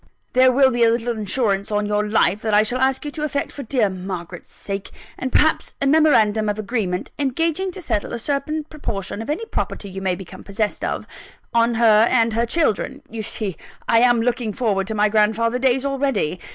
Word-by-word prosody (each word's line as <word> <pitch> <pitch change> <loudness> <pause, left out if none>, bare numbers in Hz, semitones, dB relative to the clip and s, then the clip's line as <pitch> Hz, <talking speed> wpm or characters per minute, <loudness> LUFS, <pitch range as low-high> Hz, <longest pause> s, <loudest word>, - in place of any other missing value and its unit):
There 255 0 +5
will 265 +1 +4
be 240 -1 +2
a 230 - +6
little 235 +1 0
insurance 205 -2 0
on 210 0 0
your 210 0 0
life, 210 -2 +1
that 220 -2 +1
I 210 - +6
shall 245 +4 -1
ask 265 +2 +1
you 295 - -4
to 300 - -6
effect 285 -2 -2
for 285 - -7
dear 240 -3 +1
Margaret's 180 -2 -7
sake; 195 -1 -6 0.3
and 260 - -4
perhaps, 315 +5 +2
a 280 - 0
memorandum 225 -8 +4
of 205 - -2
agreement, 205 -4 -2
engaging 325 +7 0
to 375 - -9
settle 205 - -2
a - - -3
certain 285 +5 -2
proportion 220 -10 -5
of 225 - -7
any 330 +10 -2
property 200 - -4
you 195 +1 -6
may 185 -2 0
become 185 -1 -10
possessed 210 +1 -3
of, - - -2 0.5
on 235 0 +3
her 225 -1 +5
and 230 -3 +2
her 230 +2 +1
children. 285 -1 0
You 225 0 -4
see 210 -3 -4 0.3
I 230 - +4
am 240 -1 +4
looking 235 -3 -1
forward 200 -6 0
to 220 - -3
my 210 0 +3
grandfather 220 +3 +1
days 265 +1 +2
already! 270 - -1
230 Hz, 205 wpm, -21 LUFS, 210-265 Hz, 0.5 s, a